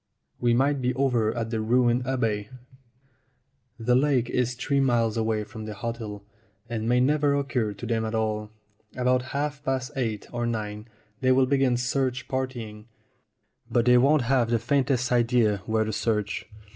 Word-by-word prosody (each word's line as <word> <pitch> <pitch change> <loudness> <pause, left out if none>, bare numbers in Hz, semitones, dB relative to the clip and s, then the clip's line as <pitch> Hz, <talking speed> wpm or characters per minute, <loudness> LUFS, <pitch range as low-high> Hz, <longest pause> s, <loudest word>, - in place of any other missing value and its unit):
We 120 -1 +2
might 140 +2 +2
be 125 0 0
over 125 -5 +1
at 115 -1 -3
the 110 -2 -1
ruined 120 +2 +2
abbey. 110 -6 -1 1.3
The 120 +1 +1
lake 130 -2 +2
is 125 0 0
three 140 +2 0
miles 120 -4 +2
away 110 -1 0
from 110 -1 -9
the 105 -1 -6
hotel, 110 -3 -5 0.4
and 115 -1 -3
may 125 0 +4
never 145 +2 +2
occur 130 -7 -1
to 100 +4 -8
them 115 -1 0
at 110 +1 -3
all. 105 -1 -1 0.5
About 125 0 +2 0.2
half 145 0 -2
past 130 -2 -2
eight 110 -6 -2
or 120 0 -1
nine 105 -1 -4 0.3
they 130 -1 +2
will 130 0 +4
begin 135 -2 +2
search 125 0 -1
partying, 120 -5 -4 0.8
but 120 -1 +2
they 125 0 +6
won't 140 +2 +4
have 120 -1 +2
the 120 - +3
faintest 130 +1 0
idea 120 -3 +3
where 110 0 +2
to 110 0 -3
search. 105 -2 -1
120 Hz, 165 wpm, -26 LUFS, 110-130 Hz, 1.3 s, they